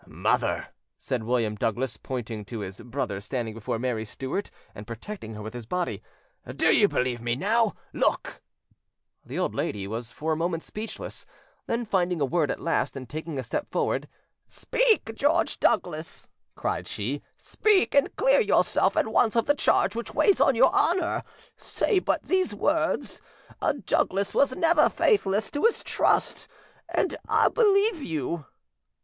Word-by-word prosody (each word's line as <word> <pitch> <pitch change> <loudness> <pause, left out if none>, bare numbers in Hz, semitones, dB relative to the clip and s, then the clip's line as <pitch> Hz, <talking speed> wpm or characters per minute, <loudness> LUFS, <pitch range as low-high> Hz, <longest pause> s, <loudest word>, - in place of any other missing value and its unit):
"Mother," - - 0 0.3
said 120 -4 -3
William 115 -3 +1
Douglas, 115 +2 -1
pointing 115 -4 -5
to 115 0 -6
his 95 -1 -7
brother 120 -6 -3
standing 115 0 -3
before 115 +1 -3
Mary 120 -2 -2
Stuart 135 - -4 0.2
and 105 +1 -10
protecting 115 - -7
her 105 - -7
with 110 - -7
his 120 -3 -8
body, 180 +5 -2 0.5
"do - - +4
you 205 - +5
believe 125 -8 -1
me 120 0 0
now? 215 - +1 0.2
Look!" - - -1 0.8
The - - -7
old - - 0
lady 100 -2 -2
was 115 +4 -5
for 160 +1 -3
a - - 0
moment 165 0 -2
speechless; 220 +2 -6 0.4
then 235 +1 -1
finding 180 -4 0
a 140 - +2
word 155 +2 +1
at - - -2
last, 165 -4 -1
and 130 -2 -7
taking 155 +3 -5
a 130 - -2
step 115 - -3
forward— - - -1 0.4
"Speak, 445 - +1
George 285 +7 +1
Douglas," 160 -2 -1 0.3
cried - - -2
she, 130 +8 -3 0.2
"speak, 420 -3 +2
and 280 0 +3
clear - - +4
yourself - - +2
at - - +3
once 225 -2 +2
of 230 - +3
the 290 - +4
charge 225 -6 +2
which 225 -1 -5
weighs 400 - +4
on 270 - +5
your 245 +3 +5
honour; 345 0 +2 0.4
say 425 -6 0
but - - -1
these 375 0 +1
words, - - 0 0.4
'A - - +1
Douglas 195 +1 +1
was 270 -2 +3
never 330 -2 +4
faithless 215 - +1
to 290 - -3
his 460 - +2
trust,' - - +1 0.4
and - - 0
I - - +4
believe 410 -5 +3
you". 160 - -3
165 Hz, 160 wpm, -26 LUFS, -, 0.8 s, you